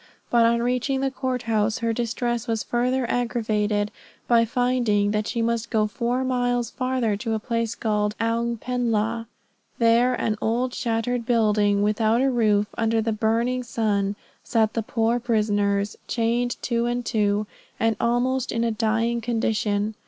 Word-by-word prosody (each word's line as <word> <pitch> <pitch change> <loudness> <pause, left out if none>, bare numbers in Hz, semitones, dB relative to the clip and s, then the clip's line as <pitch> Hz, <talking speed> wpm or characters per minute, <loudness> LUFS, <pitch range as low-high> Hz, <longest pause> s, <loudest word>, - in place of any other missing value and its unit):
But 235 -1 +5
on 235 0 +1
reaching 250 +2 0
the 270 0 0
court 255 -1 -3
house, 220 -1 +1
her 230 0 -1
distress 240 0 -2
was 225 -2 -1
further 250 +1 0
aggravated, 215 -4 0 0.4
by 230 -1 +4
finding 235 -4 +1
that 210 0 -1
she 230 -2 -1
must 235 0 -1
go 220 -3 +2
four 240 +4 -1
miles 245 -2 0
farther 255 -4 0
to 225 +2 -2
a - - -1
place 230 0 -2
called 210 -1 0
Oung 230 0 0
pen 245 -1 -1
la. 225 +2 0 0.5
There 235 +2 +4
in - - -5
an 215 -1 0
old 245 +3 0
shattered 235 +1 -1
building, 210 -4 +2
without 215 +2 +2
a 270 +1 +2
roof, 210 -4 +2
under 225 0 +2
the 220 0 0
burning 230 +4 0
sun, 205 -4 -1 0.3
sat 220 -2 +1
the 225 - 0
poor 225 +2 0
prisoners, 205 -3 0
chained 240 +1 0
two 235 -1 0
and 240 0 -2
two, 210 -2 +1 0.3
and 225 -1 +2
almost 245 +2 0
in 230 0 0
a 230 - +1
dying 225 +2 0
condition. 220 -2 0
230 Hz, 160 wpm, -24 LUFS, 215-245 Hz, 0.5 s, But